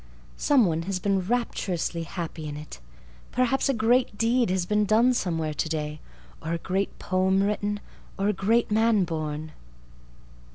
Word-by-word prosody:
Some 275 -6 +4
one 165 -2 0
has 195 - 0
been 195 +1 +1
rapturously 185 -5 -1
happy 165 -1 -5
in 145 0 -5
it. 150 - -9 0.5
Perhaps 255 +2 +1
a - - +3
great 230 0 +2
deed 235 +1 +2
has 185 -1 0
been 210 +2 +2
done 225 +5 +4
somewhere 165 -8 -1
today—or 155 +1 -5
a - - 0
great 190 +3 -2
poem 190 +1 +1
written—or 205 -1 -3
a 210 - +2
great 220 +4 +1
man 220 -1 +4
born. 155 -2 -4
195 Hz, 140 wpm, -26 LUFS, 165-225 Hz, 0.5 s, Some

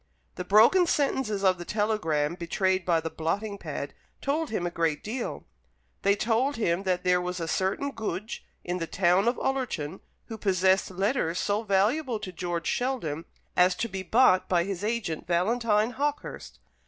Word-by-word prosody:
The 180 - -5
broken 225 - +5
sentences 265 -9 0
of 185 -2 +3
the - - -5
telegram 175 -8 0
betrayed 185 +2 0
by 165 -2 +3
the 160 - -4
blotting 200 +6 -2
pad - - -5 0.3
told 305 +3 -1
him 195 -5 -2
a 175 - -2
great 165 -3 -1
deal. 235 +3 -4 0.6
They 200 0 +3
told 230 +6 +1
him 175 -5 0
that 180 -1 0
there 180 0 +3
was 180 0 -3
a 165 - -3
certain 195 - -1
Goodge, 215 -3 -5 0.2
in 180 +1 -3
the 165 - -3
town 185 +4 +2
of 240 - +2
Ullerton, 235 - -2 0.3
who 225 -2 -8
possessed 190 -1 +2
letters 190 -2 0
so 205 +3 0
valuable 225 +6 +1
to 190 - -6
George 175 -1 -3
Sheldon, 220 - -2 0.3
as 180 0 +4
to 230 - -2
be 190 -3 -5
bought 190 -2 +4
by 175 -2 +3
his 195 0 -4
agent 210 -9 -2
Valentine 215 +5 +2
Hawkehurst. 290 +3 -4
195 Hz, 165 wpm, -27 LUFS, 175-230 Hz, 0.6 s, broken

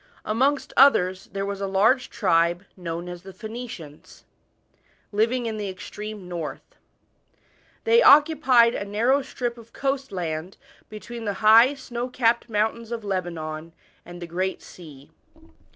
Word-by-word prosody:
Amongst 270 +6 0
others 185 -9 +4
there 195 +1 -3
was 200 0 -5
a 195 - -1
large 220 +7 +2
tr'oe, 170 -3 +1
known 170 -1 -5
as 175 -1 -8
the 190 +1 -12
Phoenicians, 220 -8 -9 0.9
living 230 +4 +1
in 220 -1 -3
the 205 -2 -4
extreme 205 +1 -8
north. 175 - -7 1.1
They 460 +1 +5
occupied 280 - +6
ai - - -3
narrow 235 +7 +2
strip 245 -2 -5
of 230 0 -16
coast 275 -2 -2
land 170 -1 -4 0.3
between 225 +2 -8
the 205 - -1
high 230 +6 +7
snow 245 -2 -5
capped 235 -1 +1
mountains 220 +2 -1
of 230 -2 -4
Lebanon 165 -4 -4 0.3
and 175 0 -11
the 175 - -6
Great 185 +3 -3
Sea. 145 -6 -14
210 Hz, 135 wpm, -24 LUFS, 180-240 Hz, 1.1 s, high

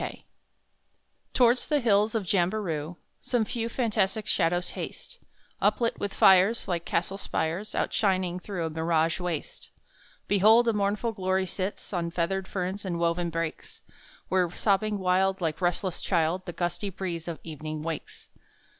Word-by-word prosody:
Kiama - - -6 1.1
Towards 245 0 +4
the 300 -1 +2
hills 215 -2 +3
of 220 - +1
Jamberoo 175 -4 0 0.3
Some 240 -3 0
few 230 +1 -3
fantastic 215 -4 0
shadows 175 -3 +1
haste, - - -7 0.4
Uplit 235 -1 +1
with 200 - -2
fires 195 +5 +5
Like 170 -2 -2
castle 190 +3 -1
spires 170 +4 -2
Outshining 185 -3 +1
through 180 -3 -4
a - - -2
mirage 165 +1 +1
waste. 175 -4 -4 0.6
Behold, 220 +4 +5
a 230 - +3
mournful 210 +3 0
glory 190 -2 0
sits 190 +3 -4
On 170 -2 -1
feathered 185 +3 -1
ferns 190 +1 -3
and 180 -3 -2
woven 170 +1 0
brakes, 165 -1 -5 0.5
Where 185 -1 +2
sobbing 210 +1 +1
wild 190 +1 +2
like 165 -2 -2
restless 175 +1 -1
child 175 +1 0
The 175 - -4
gusty 175 +4 -2
breeze 175 -3 -5
of 170 -2 -4
evening 155 -1 -6
wakes! 165 -2 -6
185 Hz, 145 wpm, -27 LUFS, 170-205 Hz, 1.1 s, fires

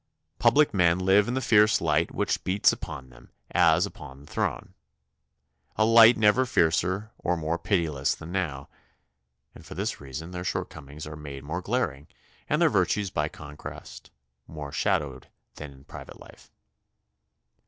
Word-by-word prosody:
Public 150 +1 +4
men 90 -3 +3
live 95 +2 +3
in 120 - -2
the 130 - -1
fierce 105 -3 +4
light 80 0 +1
which - - -1
beats 95 +2 +3
upon 65 -1 -8
them - - -18 0.2
as 85 0 +4
upon 70 -8 -11
the - - -15
throne, - - -3 1.0
a 110 - +3
light 115 +1 +7
never 110 +4 +4
fiercer 95 +3 +1
or 90 0 -1
more 80 +1 -2
pitiless 80 -8 0
than 80 - -10
now, 80 -8 -3 0.9
and - - -14
for - - -10
this - - -3
reason 70 +5 -7
their 90 0 -5
shortcomings 75 -3 -5
are 75 0 -8
made 70 -3 -9
more 80 +5 -4
glaring 90 - -2 0.4
and - - +1
their - - +5
virtues 100 -2 +1
by 75 0 -1
contrast 75 -1 -10 0.4
more 75 -2 -8
shadowed 65 -3 -1 0.3
than 75 -1 -8
in 70 0 -17
private - - -11
life. - - -16
85 Hz, 155 wpm, -26 LUFS, 75-100 Hz, 1.0 s, light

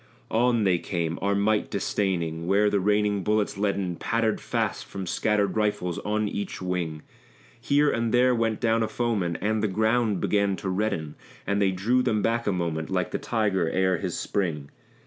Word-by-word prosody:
On 120 0 +2
they 90 -3 +3
came, 85 -2 -3
our 100 0 +1
might 105 +1 +1
disdaining, 85 -4 -1
where 100 +2 +3
the 100 - +2
raining 105 +1 +1
bullets 105 +1 0
leaden 100 -3 -1
Pattered 115 -1 0
fast - - -2
from 95 -1 -7
scattered 105 +2 0
rifles 105 -5 0
on 105 0 -1
each 100 -1 -4
wing; 90 -4 -3 0.6
Here 145 +1 +3
and 115 -1 -1
there 125 +1 +4
went 115 -2 0
down 115 -1 +2
a 110 - +1
foeman, 105 -9 -1
and 110 +2 0
the 110 - +1
ground 110 0 +1
began 100 0 +1
to 95 - -4
redden; 90 -6 -1 0.3
And 100 +1 0
they 100 - +4
drew 105 +8 +1
them 105 -4 0
back 115 0 0
a - - +3
moment, 85 -3 -2
like 90 -1 -1
the - - -2
tiger 100 -7 0
ere 95 -1 +1
his - - -3
spring. 80 -8 -2
100 Hz, 180 wpm, -26 LUFS, 90-110 Hz, 0.6 s, there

